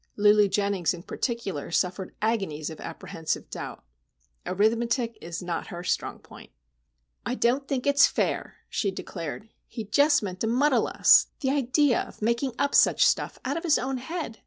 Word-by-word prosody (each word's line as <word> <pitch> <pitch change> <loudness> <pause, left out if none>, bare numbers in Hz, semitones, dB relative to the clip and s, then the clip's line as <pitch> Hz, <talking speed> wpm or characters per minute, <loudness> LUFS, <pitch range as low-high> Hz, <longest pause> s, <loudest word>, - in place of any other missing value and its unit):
Lulu 210 0 +5
Jennings, 200 -3 0
in 170 - -11
particular, 215 - -3
suffered 180 +2 -1
agonies 195 -9 -1
of 160 - -10
apprehensive 160 -2 -5
doubt. - - -7 0.6
Arithmetic 230 +4 +1
is 170 +2 -6
not 170 -2 -3
her 175 0 -7
strong - - -2
point. - - -15 0.7
"I 245 - -2
don't 260 +3 +1
think 260 -3 -2
it's 280 -1 +6
fair," - - -2
she 200 - -1
declared. 185 +2 -6 0.2
"He 225 - -6
just 285 +6 +3
meant 185 -2 -5
to 225 - -1
muddle 265 +6 +2
us. - - +5
The 265 -2 +1
idea 275 -1 +2
of - - -10
making 235 +4 0
up 285 0 0
such - - +5
stuff - - +1
out 280 +4 -1
of 330 - -5
his 320 -4 +4
own 265 +1 -2
head! 300 -3 -5
225 Hz, 165 wpm, -26 LUFS, 185-265 Hz, 0.7 s, it's